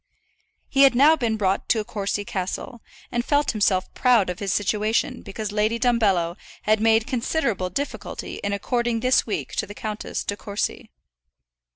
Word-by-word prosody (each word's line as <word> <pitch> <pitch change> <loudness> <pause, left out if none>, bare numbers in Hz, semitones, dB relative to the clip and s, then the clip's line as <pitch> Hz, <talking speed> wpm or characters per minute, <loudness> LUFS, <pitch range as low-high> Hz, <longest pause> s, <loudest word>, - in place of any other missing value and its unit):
He 275 - +2
had 275 -3 +7
now 295 +5 +6
been 230 -7 -1
brought 195 -2 0
to 220 -3 +2
Courcy 205 -2 -3
Castle, 195 +5 -4 0.3
and 240 -1 0
felt 290 +2 +2
himself 200 -4 +1
proud 235 -8 +3
of 180 - -8
his 200 -3 -2
situation 210 +3 0
because 210 +1 -5
Lady 215 +2 +1
Dumbello 200 -9 +2 0.3
had 215 0 +3
made 225 0 +4
considerable 235 - -1
difficulty 280 +10 -5
in 200 - -3
according 235 +3 -1
this 255 0 +3
week 215 - -3
to - - 0
the 205 - -9
Countess 215 0 -4
De 205 - -2
Courcy. 205 0 -4
215 Hz, 160 wpm, -24 LUFS, 200-240 Hz, 0.3 s, had